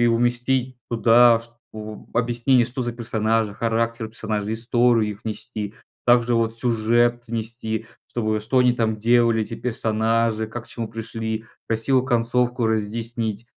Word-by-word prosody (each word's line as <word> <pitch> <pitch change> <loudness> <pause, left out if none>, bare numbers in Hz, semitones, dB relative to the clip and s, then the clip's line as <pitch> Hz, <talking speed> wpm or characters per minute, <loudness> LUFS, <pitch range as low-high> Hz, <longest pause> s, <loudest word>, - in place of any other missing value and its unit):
и 120 - +4
уместить 120 +2 +1
туда 115 0 +5
что, 110 -2 -11
объяснение, 120 +2 +3
что 125 +2 -4
за 120 0 -2
персонажи, 110 -2 0
характер 115 0 -1
персонажей, 110 -1 -3
историю 115 -1 +2
их 100 +3 -15
внести, 110 -1 -5 0.3
также, 120 0 +4
вот, 115 0 0
сюжет 120 0 +2
внести, 110 -1 -4 0.2
чтобы, 110 -2 -1
что 130 +5 +1
они 125 -1 +5
там 115 -2 0
делали, 115 0 +3
эти - - -5
персонажи, 110 -1 0
как 120 +1 -7
к - - -22
чему 115 -2 -5
пришли, 110 0 -4 0.2
красивую 120 +4 +2
концовку 120 0 +1
разъяснить. 110 0 -2
115 Hz, 135 wpm, -23 LUFS, 110-120 Hz, 0.3 s, туда